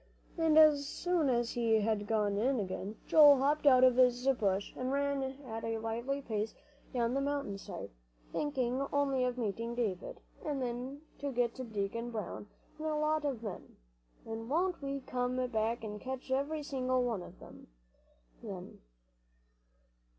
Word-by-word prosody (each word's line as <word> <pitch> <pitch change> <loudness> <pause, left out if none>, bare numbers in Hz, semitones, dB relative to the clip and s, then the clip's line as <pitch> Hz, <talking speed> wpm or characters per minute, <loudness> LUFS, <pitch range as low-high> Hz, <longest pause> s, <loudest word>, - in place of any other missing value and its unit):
And 320 -2 +3
as 295 -2 +6
soon 350 -5 +1
as 240 -2 +1
he 230 -2 +2
had 205 -1 0
gone 210 -2 +1
in 250 +5 +1
again, 195 +1 -4
Joel 295 -3 +8
hopped 290 +3 +2
out 255 -2 +7
of 255 -1 +6
his 250 0 +4
bush, 200 -6 0
and 255 +1 -2
ran 280 0 0
at 265 -4 -5
a 225 0 -1
lively 235 +5 -3
pace 215 -2 -2 0.4
down 240 -2 0
the 275 - +1
mountain 280 -8 -2
side, - - -7 0.4
thinking 265 -3 -1
only 275 -3 +2
of 250 0 -2
meeting 230 +1 -2
David, 210 -7 -2 0.2
and 295 -3 -2
then 255 +3 -4 0.2
to 285 -1 -2
get 240 -2 +1
Ben 255 -1 -5
and 220 - -14
Deacon 220 +4 -2
Brown 215 -2 -5 0.3
and 315 - -3
a 310 - 0
lot 305 0 +1
of 255 -5 -2
men, 205 -4 -7 0.5
"and 225 +1 -6
won't 350 +4 +1
we 275 0 -3
come 250 -1 -2
back 225 +1 -1
and 210 -1 -6
catch 260 0 -6
every 290 +3 0
single 255 -2 0
one 230 -6 -1
of 175 - -12
'em, - - -13 0.7
then!" - - -8
250 Hz, 165 wpm, -33 LUFS, 225-280 Hz, 0.7 s, Joel